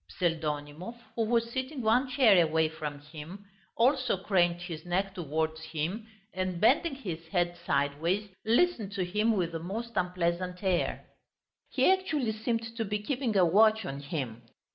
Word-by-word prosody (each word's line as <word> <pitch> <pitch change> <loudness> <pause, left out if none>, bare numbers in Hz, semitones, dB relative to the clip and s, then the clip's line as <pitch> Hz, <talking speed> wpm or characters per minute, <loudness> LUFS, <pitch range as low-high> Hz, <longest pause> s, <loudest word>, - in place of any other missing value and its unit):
Pseldonimov, 160 +4 -2 0.2
who 230 - +1
was 230 +1 +1
sitting 260 +1 -3
one 245 +4 +3
chair 225 -9 +6
away 160 0 +2
from 150 -2 -6
him, 155 +7 -10 0.3
also 255 -2 +3
craned 175 -3 +2
his 165 -3 -6
neck 190 +2 -1
towards 160 -2 -2
him, 160 +8 -3 0.3
and 185 -2 -2
bending 275 - +3
his 170 -11 -6
head 175 0 0
sideways, 155 +9 0 0.2
listened 230 - +2
to 190 -3 -1
him 210 +4 +1
with 175 -2 0
the 165 - -4
most 220 +8 -5
unpleasant 180 +1 -1
air. 185 -2 0 0.6
He - - +1
actually 310 - -1
seemed 225 +1 -3
to 225 - 0
be 210 0 -1
keeping 235 0 -1
a 185 - +6
watch 215 +5 +4
on 135 +1 -4
him. 140 -6 -4
185 Hz, 155 wpm, -30 LUFS, 165-225 Hz, 0.6 s, chair